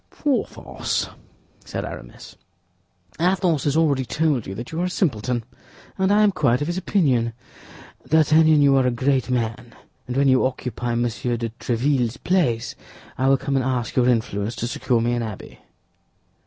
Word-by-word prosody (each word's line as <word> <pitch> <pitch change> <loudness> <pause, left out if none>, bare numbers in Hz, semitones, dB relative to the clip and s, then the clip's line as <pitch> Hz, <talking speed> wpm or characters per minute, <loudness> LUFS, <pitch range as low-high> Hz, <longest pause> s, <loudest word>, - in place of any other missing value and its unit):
"Porthos," 285 -4 -2 0.5
said - - -5
Aramis, - - -10 0.8
"Athos 175 -4 +1
has 145 +1 +1
already 145 -5 +2
told 150 -3 0
you 95 - -5
that 120 +4 -7
you 165 +1 -2
are - - +1
a - - -1
simpleton, 125 - -1 0.5
and 190 0 +1
I 210 +1 +5
am 210 - +4
quite 130 -9 +2
of 145 - -1
his 175 +3 -3
opinion. 130 - +1 0.8
D'Artagnan, 155 -1 +5
you 140 -1 +5
are 130 -1 +3
a - - +4
great 130 +1 0
man; 120 -1 -2 0.3
and 125 +1 -3
when 140 0 +3
you 130 -1 +4
occupy 125 -2 -2
Monsieur 120 0 -1
de 115 0 -3
Tréville's 120 +1 -1
place, 150 -12 0 0.4
I 130 - 0
will 135 - +5
come 140 +1 -2
and 135 - +2
ask 125 -3 -2
your 125 -1 +3
influence 110 -2 -1
to 120 - -3
secure 120 0 0
me 120 +1 +1
an 120 - -1
abbey." 110 -3 -7
130 Hz, 170 wpm, -22 LUFS, 120-155 Hz, 0.8 s, I